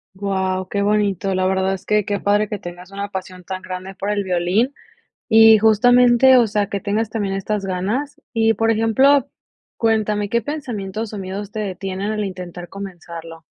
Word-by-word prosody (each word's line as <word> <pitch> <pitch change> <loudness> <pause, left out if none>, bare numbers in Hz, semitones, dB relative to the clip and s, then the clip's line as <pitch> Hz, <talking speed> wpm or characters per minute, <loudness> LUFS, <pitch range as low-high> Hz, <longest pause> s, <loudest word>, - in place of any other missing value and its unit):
Wao, 190 -1 -2
qué 200 0 -1
bonito, 200 -2 +1
la 185 0 +1
verdad 190 0 +1
es 190 - -7
que 210 -1 +2
qué 205 -2 -1
padre 205 +1 +2
que 205 -1 -5
tengas 175 +2 -10
una 200 0 -5
pasión 185 -2 -7
tan 185 +1 -6
grande 185 +1 -7
por 200 +2 -3
el 205 -1 0
violín 185 +9 0 0.5
y 225 0 +7
justamente, 245 +4 +5
o 235 -3 +4
sea, 205 -1 0
que 200 -1 -3
tengas 215 +1 -1
también 205 -4 -2
estas 200 +1 -2
ganas. 215 +12 -3
Y 225 -1 +2
por 225 0 +2
ejemplo, 260 +5 +3 0.5
cuéntame, 215 -2 +1
¿qué 235 +1 0
pensamientos 225 -7 -5
o 210 - -5
miedos 195 +2 -6
te 215 - -4
detienen 195 0 -4
al 210 -1 -2
intentar 180 -2 -7
comenzarlo? 170 -4 -9
205 Hz, 175 wpm, -20 LUFS, 190-220 Hz, 0.5 s, y